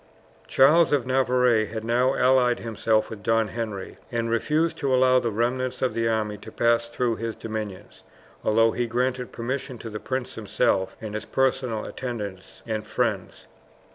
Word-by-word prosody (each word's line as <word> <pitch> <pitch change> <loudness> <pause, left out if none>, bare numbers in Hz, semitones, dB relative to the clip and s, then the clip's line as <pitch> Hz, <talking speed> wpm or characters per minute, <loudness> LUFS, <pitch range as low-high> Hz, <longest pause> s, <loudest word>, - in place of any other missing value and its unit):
Charles 150 - +5
of 140 -5 +2
Navarre 125 -3 +3
had 110 +1 -5
now 125 +3 +2
allied 125 -1 +3
himself 110 -1 0
with 110 -2 -7
Don 115 0 +1
Henry, 110 -5 -5
and 115 -1 -1
refused 160 +7 +1
to 140 - 0
allow 130 0 +5
the 120 - -1
remnants 125 +4 -1
of 130 - +1
the 115 0 0
army 105 -2 -1
to - - -11
pass 115 0 +2
through 120 -1 -1
his 115 0 -4
dominions, 110 -4 -6 0.4
although 115 +1 +4
he 120 +1 -1
granted 125 +1 -1
permission 130 +2 -4
to 115 0 -8
the 105 - -5
prince 130 +1 -3
himself 95 -3 0
and 110 -2 -6
his 110 - -4
personal 130 -4 0
attendants 105 -7 -6
and 110 -1 -3
friends. - - -2
115 Hz, 165 wpm, -25 LUFS, 110-130 Hz, 0.4 s, Charles